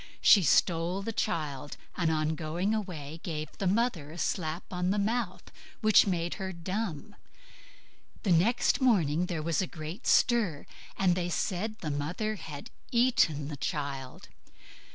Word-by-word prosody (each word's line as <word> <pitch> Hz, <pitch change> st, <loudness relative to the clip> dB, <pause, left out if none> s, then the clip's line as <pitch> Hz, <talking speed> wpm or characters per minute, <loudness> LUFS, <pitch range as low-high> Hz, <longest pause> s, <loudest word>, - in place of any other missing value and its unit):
She 205 Hz, -, +7 dB
stole 175 Hz, +3 st, +2 dB
the 225 Hz, -, -3 dB
child, 145 Hz, -6 st, -2 dB, 0.2 s
and 170 Hz, -3 st, +1 dB
on 155 Hz, 0 st, +1 dB
going 170 Hz, +6 st, -1 dB
away 165 Hz, -8 st, -4 dB
gave 155 Hz, -3 st, -5 dB
the 195 Hz, -, 0 dB
mother 195 Hz, -7 st, +1 dB
a 160 Hz, -, -10 dB
slap 165 Hz, -1 st, -2 dB
on 180 Hz, 0 st, 0 dB
the 200 Hz, -, +1 dB
mouth 215 Hz, 0 st, -2 dB, 0.3 s
which 215 Hz, -2 st, +6 dB
made 175 Hz, -2 st, -1 dB
her 190 Hz, 0 st, -3 dB
dumb. 185 Hz, +1 st, -4 dB, 1.1 s
Next 205 Hz, +10 st, +3 dB
morning 180 Hz, -, +3 dB
there 165 Hz, -4 st, -3 dB
was 165 Hz, +1 st, +1 dB
a 185 Hz, -, -1 dB
great 160 Hz, +8 st, -7 dB
stir, 215 Hz, -, +3 dB, 0.3 s
and 185 Hz, -2 st, +3 dB
they 175 Hz, 0 st, -1 dB
said 200 Hz, +5 st, -2 dB
the 155 Hz, -, -2 dB
mother 165 Hz, +10 st, -2 dB
had 150 Hz, -5 st, -8 dB, 0.2 s
eaten 235 Hz, -, +3 dB
the 145 Hz, -1 st, -6 dB
child. 135 Hz, -1 st, -4 dB
175 Hz, 145 wpm, -29 LUFS, 155-205 Hz, 1.1 s, She